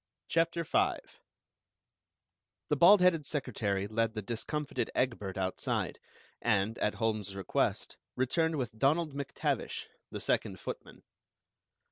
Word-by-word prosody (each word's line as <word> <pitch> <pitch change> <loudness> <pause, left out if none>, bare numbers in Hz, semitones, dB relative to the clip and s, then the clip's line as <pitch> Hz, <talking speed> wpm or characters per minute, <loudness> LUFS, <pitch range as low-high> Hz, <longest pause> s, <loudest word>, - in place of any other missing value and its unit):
CHAPTER 165 +1 +1
V - - +2 1.7
The 150 - +3
bald 180 +6 +8
headed 175 -4 +4
secretary 110 -9 -1
led 115 +1 0
the 110 - -3
discomfited 135 +7 -2
Egbert 110 -7 -1
outside, 95 -1 -1 0.4
and, 110 -1 +1
at 105 - +1
Holmes's 110 -4 -1
request, 95 -2 -1 0.2
returned 160 +6 +1
with 120 -6 -4
Donald 155 +3 +2
MacTavish, 140 -1 -2 0.2
the - - -5
second - - 0
footman. - - -7
120 Hz, 110 wpm, -32 LUFS, 105-150 Hz, 1.7 s, bald